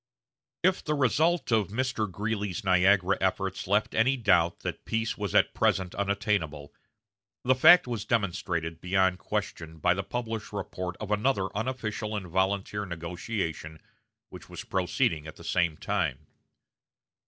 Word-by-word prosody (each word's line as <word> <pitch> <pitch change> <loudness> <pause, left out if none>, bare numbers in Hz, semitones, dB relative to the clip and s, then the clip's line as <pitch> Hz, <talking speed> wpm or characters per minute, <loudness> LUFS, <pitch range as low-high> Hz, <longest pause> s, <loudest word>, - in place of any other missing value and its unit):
If 185 +1 +2
the 150 - 0
result 155 +4 +2
of 110 -4 +3
Mr. 110 -2 -2
Greeley's 105 +1 -3
Niagara 95 0 +3
efforts 95 0 -1
left 105 +2 +1
any 130 +4 +3
doubt 90 -7 +2
that - - -5
peace 115 0 -1
was 105 -3 -4
at - - +4
present 95 -2 +1
unattainable, 95 -8 -1 0.7
the 130 - +4
fact 175 +8 +7
was 120 -4 -3
demonstrated 85 -6 -1
beyond 95 0 +2
question 80 -1 -4
by 85 +3 +3
the 95 - -2
published 115 0 -5
report 90 -2 -4
of 105 -1 -5
another 105 -3 0
unofficial 110 -2 -3
and 100 -3 -4
volunteer 95 +3 -1
negotiation 85 -2 -4 0.5
which - - -11
was - - -7
proceeding 90 - 0
at 80 - -9
the - - -13
same 85 -4 0
time. - - -2
100 Hz, 140 wpm, -28 LUFS, 90-110 Hz, 0.7 s, fact